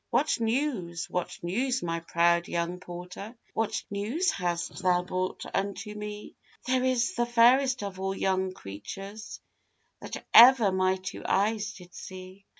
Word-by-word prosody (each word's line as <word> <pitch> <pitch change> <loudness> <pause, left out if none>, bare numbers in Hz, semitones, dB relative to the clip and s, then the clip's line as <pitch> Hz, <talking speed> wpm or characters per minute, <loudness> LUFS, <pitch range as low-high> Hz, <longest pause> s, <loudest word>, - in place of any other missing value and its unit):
'What - - +1
news, 225 - -1
what 180 - -3
news, 250 +9 -1
my 165 -1 -2
proud 170 +1 +2
young 170 +1 -2
porter? 180 +5 -8 0.2
What 225 -1 -1
news 225 - 0
hast 175 0 -3
thou 180 -1 +2
brought 185 +1 -3
unto 200 +2 -3
me?' 210 0 -7 0.3
'There 255 0 +1
is 255 -2 +1
the 240 0 0
fairest 245 +1 +4
of 195 -2 -6
all 195 0 -2
young 190 0 0
creatures 195 - -8 0.6
That - - -7
ever 235 -4 +9
my 185 0 +2
two 190 -1 -7
eyes 210 +1 0
did 180 -1 -14
see! 185 +1 -10
195 Hz, 145 wpm, -28 LUFS, 180-230 Hz, 0.6 s, ever